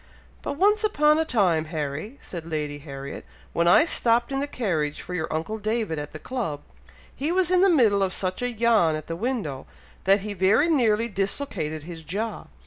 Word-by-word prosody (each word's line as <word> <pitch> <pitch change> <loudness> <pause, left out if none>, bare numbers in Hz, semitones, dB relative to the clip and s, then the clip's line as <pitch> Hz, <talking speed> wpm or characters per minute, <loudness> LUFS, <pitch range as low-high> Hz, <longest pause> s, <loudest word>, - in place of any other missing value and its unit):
"But - - -3
once 420 +5 +3
upon 300 -7 +3
a 320 - +1
time, 185 - +2
Harry," 155 - -4
said 170 -3 -7
Lady 150 -2 -3
Harriet, 140 -1 -8 0.3
"when 170 0 +2
I 175 - +6
stopped 235 -5 +2
in 270 - 0
the 285 - -1
carriage 165 - -2
for 180 - -7
your 170 -3 -3
uncle 165 +8 -3
David 215 -6 -1
at 145 0 -6
the - - -7
club, 165 - -4 0.5
he 295 +4 -1
was 365 0 +2
in 365 -1 +4
the 390 - +6
middle 225 - +4
of 190 -1 +1
such 185 +1 -1
a 245 - 0
yawn 220 -8 +3
at 155 -1 -6
the 165 - -4
window, 180 - -3 0.4
that 195 +1 +4
he 210 +1 -4
very 200 - +3
nearly 230 -7 +3
dislocated 195 - -2
his 165 0 -9
jaw! 210 +8 -4
200 Hz, 195 wpm, -25 LUFS, 160-250 Hz, 0.5 s, I